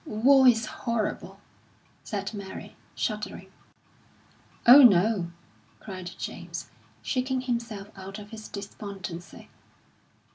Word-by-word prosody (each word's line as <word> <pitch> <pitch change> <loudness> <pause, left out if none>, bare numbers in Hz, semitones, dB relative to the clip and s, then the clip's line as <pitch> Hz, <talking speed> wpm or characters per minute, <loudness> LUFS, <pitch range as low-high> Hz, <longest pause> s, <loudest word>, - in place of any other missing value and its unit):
"War 260 +5 +5
is 230 -2 +5
horrible!" 230 -1 -3 0.6
said 200 0 -4
Mary, 200 -2 -8 0.2
shuddering. - - -4 1.1
"Oh, 260 +4 +11
no!" 200 -5 +5 0.5
cried 185 -4 -7
James, - - -6 0.3
shaking 260 0 -1
himself 230 -5 -4
out 195 +1 -8
of 210 -1 -11
his 220 -1 -8
despondency. 200 -3 -8
215 Hz, 95 wpm, -27 LUFS, 195-235 Hz, 1.1 s, Oh